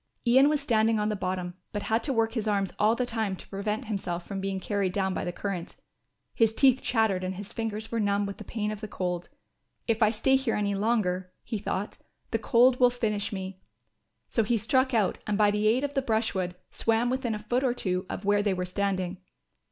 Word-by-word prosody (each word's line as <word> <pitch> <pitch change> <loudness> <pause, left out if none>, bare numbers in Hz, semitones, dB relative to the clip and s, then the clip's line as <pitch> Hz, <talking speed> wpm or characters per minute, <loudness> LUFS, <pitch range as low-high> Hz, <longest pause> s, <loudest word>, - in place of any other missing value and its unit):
Ian 260 +4 +6
was 300 -1 +2
standing 225 -2 +2
on 210 0 +1
the 210 - 0
bottom, 185 -2 -3 0.2
but 205 - -3
had 225 +1 +1
to 290 - 0
work 225 -2 +1
his 225 -3 -2
arms 200 -2 0
all 215 +2 +4
the 250 - 0
time 220 -5 -2
to - - -13
prevent 210 +2 -3
himself 180 -5 -3
from 195 -2 -4
being 195 0 -2
carried 195 -1 -1
down 190 -1 0
by - - -2
the 175 - -2
current. 180 -2 -4 0.6
His 225 -1 +2
teeth 260 0 +5
chattered 220 -6 +1
and 185 +1 -3
his 200 +1 -8
fingers 225 -1 -4
were 230 - 0
numb 205 -1 +1
with 200 0 -5
the - - -8
pain 210 -2 -3
of 215 0 -6
the 215 - -4
cold. 180 -3 -3 0.6
"If 230 0 0
I 215 - +6
stay 250 +5 +3
here 265 -4 -1
any 205 -1 0
longer," 195 -4 0
he 220 - -3
thought, 195 +1 -3 0.3
"the - - +1
cold 250 0 +4
will 250 -1 +7
finish 215 -4 -1
me." 190 -1 -6 0.7
So 230 - +1
he 230 +2 +1
struck 260 +5 +2
out 215 -6 +1
and 210 -1 +1
by 210 -1 +5
the 210 +1 +1
aid 240 +5 +3
of 285 0 -2
the 270 - +1
brushwood 220 -7 -1 0.2
swam 230 +2 +1
within 255 -4 -1
a 210 - -7
foot 245 +5 0
or 250 -2 +1
two 185 -4 -1
of 195 - -5
where 205 0 +3
they 205 -2 +1
were 180 0 -2
standing. 185 -1 -1
210 Hz, 225 wpm, -28 LUFS, 195-230 Hz, 0.7 s, will